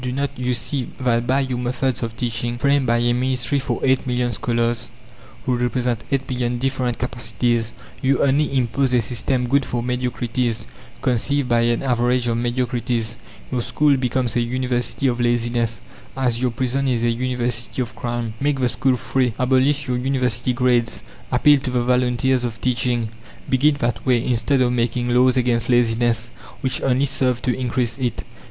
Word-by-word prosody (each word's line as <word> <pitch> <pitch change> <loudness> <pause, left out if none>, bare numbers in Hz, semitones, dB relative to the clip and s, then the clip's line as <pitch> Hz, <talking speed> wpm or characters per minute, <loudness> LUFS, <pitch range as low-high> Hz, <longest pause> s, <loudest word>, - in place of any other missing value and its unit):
Do 125 - -2
not 140 +2 -1
you 125 0 -1
see 130 0 -2
that 120 -2 +1
by 135 +2 +3
your 130 -2 -2
methods 125 +1 -1
of 115 -1 -4
teaching, 120 -1 -2
framed 140 +1 +2
by 120 0 +3
a 120 0 +2
Ministry 130 +2 0
for 135 - -2
eight 130 0 +2
million 125 -1 0
scholars, 115 +1 -1 0.6
who 125 - +1
represent 120 -1 -1
eight 135 -1 0
million 125 -1 -1
different 130 -1 -1
capacities, 120 -2 -1 0.3
you 135 0 +2
only 140 +2 +2
impose 130 +1 +1
a 125 - +4
system 125 +2 0
good 140 +2 +3
for 120 -2 -3
mediocrities, 125 -1 -1 0.4
conceived 130 +2 +1
by 120 -1 +3
an 120 +1 +1
average 125 -1 +1
of 115 - +1
mediocrities? 120 -1 -1 0.3
Your 125 -2 0
school 145 +4 +2
becomes 125 -2 -1
a 120 - +3
University 125 +2 -1
of 125 -2 +1
laziness, 120 -2 0 0.4
as 125 -3 0
your 130 - +2
prison 130 +3 -1
is 120 -3 0
a 120 - +3
University 120 0 -2
of 120 - -10
crime. 120 -2 -3
Make 140 -1 0
the 125 -1 +2
school 130 0 +1
free, 125 -2 0
abolish 135 +3 +2
your 125 -1 0
University 125 -2 0
grades, 120 -1 +1 0.3
appeal 145 +3 +5
to 130 - -4
the 125 -1 0
volunteers 125 +1 +2
of 115 -2 -4
teaching; 120 -2 0 0.4
begin 145 +3 +3
that 120 -4 -2
way, 125 -3 +2
instead 130 +3 +1
of 125 -1 +2
making 120 0 0
laws 125 +1 +4
against 120 -1 +1
laziness 120 -1 +2 0.3
which 130 0 -1
only 135 +1 +2
serve 130 -3 0
to 125 - +1
increase 125 -1 -1
it. 125 -3 -2
125 Hz, 175 wpm, -21 LUFS, 120-130 Hz, 0.6 s, appeal